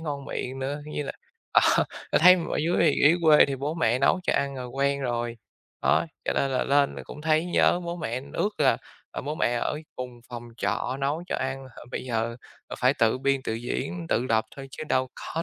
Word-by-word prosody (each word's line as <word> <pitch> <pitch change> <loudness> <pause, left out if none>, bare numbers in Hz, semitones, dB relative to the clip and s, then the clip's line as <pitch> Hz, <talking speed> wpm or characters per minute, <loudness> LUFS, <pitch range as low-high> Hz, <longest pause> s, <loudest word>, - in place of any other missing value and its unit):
ngon 145 -4 -4
miệng 130 +1 -4
nữa. 140 +2 -3
Như 150 -1 -4
là, - - -5 0.4
à, - - +7 0.5
ta - - +4
thấy 180 +4 +8
mà 170 - -3
ở - - 0
dưới 165 +3 +1
thì 155 -4 +4
dưới 155 +4 +6
quê 155 -2 +7
thì 135 -1 -3
bố 145 +4 -3
mẹ 125 -7 +2
nấu 160 +7 +3
cho - - +1
ăn 140 -1 0
rồi 125 -1 -5
quen 140 +2 0
rồi, 120 -2 -2 0.5
đó, - - +3 0.2
cho - - +1
nên 135 - 0
là 130 - 0
lên 140 0 +3
rồi - - -8
cũng 150 - -10
thấy 155 +1 +2
nhớ 175 0 +3
bố 170 0 -4
mẹ, 125 -6 -3
ước 205 0 -1
là, - - +4 0.4
à, - - -4
bố 150 +3 -4
mẹ 120 - +1
ở 135 +5 -1 0.2
cùng 125 -1 -7
phòng 120 -1 -8
trọ 130 +1 -1
nấu 145 +5 -1
cho - - -2
ăn, 135 0 -3
h 120 - -16
bây - - -4
giờ, 115 -1 -2 0.3
ờ, - - -7
phải 130 +2 +3
tự 115 0 +2
biên 135 0 +1
tự 110 - -2
diễn, 90 -7 -4
tự 120 +3 +1
lập 110 0 +2
thôi 135 -1 -8
chứ 155 - -7
đâu 130 0 +1
có 165 - -4
135 Hz, 235 wpm, -26 LUFS, 125-150 Hz, 0.5 s, thấy